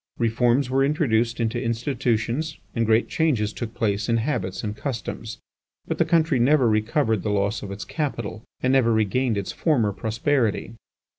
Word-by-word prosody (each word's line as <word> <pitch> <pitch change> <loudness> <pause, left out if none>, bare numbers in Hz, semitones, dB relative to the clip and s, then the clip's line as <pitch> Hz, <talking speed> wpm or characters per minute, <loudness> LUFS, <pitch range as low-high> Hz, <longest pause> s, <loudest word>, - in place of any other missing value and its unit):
Reforms 120 +3 +2
were 135 +1 +2
introduced 120 -6 +1
into 115 +1 -1
institutions 120 +4 -1 0.2
and 115 -2 0
great 110 +1 +3
changes 120 -10 0
took 120 -1 -6
place 105 -1 -1
in 115 - +3
habits 95 -7 -2
and 105 -1 -3
customs, 115 -3 -5 0.5
but - - -3
the - - +4
country 160 -5 +2
never 130 +1 +4
recovered 110 0 +1
the 105 - -2
loss 100 +1 0
of 100 - -7
its 100 +1 -6
capital, 120 -8 -4 0.2
and 130 +1 +2
never 125 -4 +4
regained 110 +2 +1
its 100 - -3
former 120 -11 +1
prosperity. 115 +3 0
115 Hz, 160 wpm, -24 LUFS, 110-130 Hz, 0.5 s, the